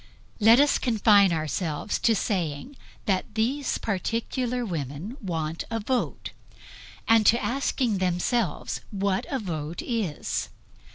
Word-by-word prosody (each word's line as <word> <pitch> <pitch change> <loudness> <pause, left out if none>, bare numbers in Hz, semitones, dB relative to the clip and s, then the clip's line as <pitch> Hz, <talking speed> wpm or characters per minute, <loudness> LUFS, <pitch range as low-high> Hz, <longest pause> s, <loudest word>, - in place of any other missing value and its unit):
Let 225 +3 +7
us 290 0 +4
confine 210 -5 +4
ourselves 155 +3 -2
to 230 - +3
saying 185 - -2 0.3
that 195 +1 -1
these 255 +5 0
particular 230 +4 -2
women 165 - -5
want 165 -4 -3
a 225 0 -2
vote 245 +3 -2 0.8
and 225 -1 +5
to 235 - +5
asking 250 -5 0
themselves 185 +4 -1
what 195 -1 -1
a 275 - -1
vote 165 - -4
is. 215 - -2
205 Hz, 115 wpm, -26 LUFS, 175-235 Hz, 0.8 s, Let